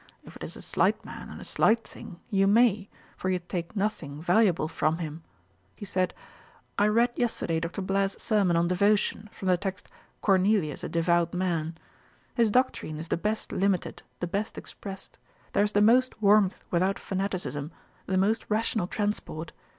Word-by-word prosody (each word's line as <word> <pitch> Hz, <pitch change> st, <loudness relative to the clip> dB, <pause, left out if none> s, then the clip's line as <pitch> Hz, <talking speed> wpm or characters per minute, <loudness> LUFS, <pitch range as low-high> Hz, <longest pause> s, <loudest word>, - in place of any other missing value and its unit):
If -, -, -13 dB
it -, -, -9 dB
is -, -, -6 dB
a -, -, -10 dB
slight -, -, +1 dB
man, -, -, -8 dB
and -, -, -9 dB
a -, -, -8 dB
slight 230 Hz, +1 st, +3 dB
thing, 180 Hz, -4 st, -11 dB
you 195 Hz, -1 st, +3 dB
may; 210 Hz, -2 st, +4 dB, 0.3 s
for 185 Hz, -, -3 dB
you 185 Hz, -, +2 dB
take 175 Hz, +1 st, -5 dB
nothing 180 Hz, -9 st, -2 dB
valuable 175 Hz, -1 st, +3 dB
from 160 Hz, 0 st, 0 dB
him.' 160 Hz, -1 st, -5 dB, 0.5 s
He 205 Hz, -, -8 dB
said, 185 Hz, -1 st, -1 dB, 0.6 s
'I 205 Hz, -, +5 dB
read 235 Hz, +3 st, +3 dB
yesterday 220 Hz, -9 st, 0 dB
Dr. 170 Hz, +4 st, -4 dB
Blair's 195 Hz, +1 st, 0 dB
sermon 195 Hz, -6 st, +2 dB
on 170 Hz, +1 st, +2 dB
Devotion, 205 Hz, +3 st, +1 dB
from 190 Hz, -, -6 dB
the 180 Hz, -, +4 dB
text 195 Hz, +1 st, -5 dB, 0.3 s
"Cornelius, 190 Hz, -5 st, +2 dB
a -, -, -3 dB
devout 170 Hz, +1 st, +1 dB
man." 170 Hz, -3 st, -1 dB, 0.6 s
His 230 Hz, -3 st, +3 dB
doctrine 230 Hz, -9 st, 0 dB
is 160 Hz, +1 st, -7 dB
the -, -, +2 dB
best 210 Hz, +5 st, -2 dB
limited, 195 Hz, -2 st, 0 dB, 0.2 s
the -, -, +1 dB
best 200 Hz, +5 st, -3 dB
expressed: 195 Hz, -1 st, -9 dB, 0.3 s
there 205 Hz, -, +4 dB
is 210 Hz, 0 st, -1 dB
the 205 Hz, -, +4 dB
most 250 Hz, +3 st, +4 dB
warmth 205 Hz, -2 st, +3 dB
without 185 Hz, +3 st, +2 dB
fanaticism, 180 Hz, -7 st, -3 dB, 0.4 s
the 190 Hz, -, +1 dB
most 205 Hz, +4 st, +2 dB
rational 215 Hz, -3 st, +1 dB
transport. 205 Hz, -6 st, -3 dB
195 Hz, 170 wpm, -28 LUFS, 170-210 Hz, 0.6 s, I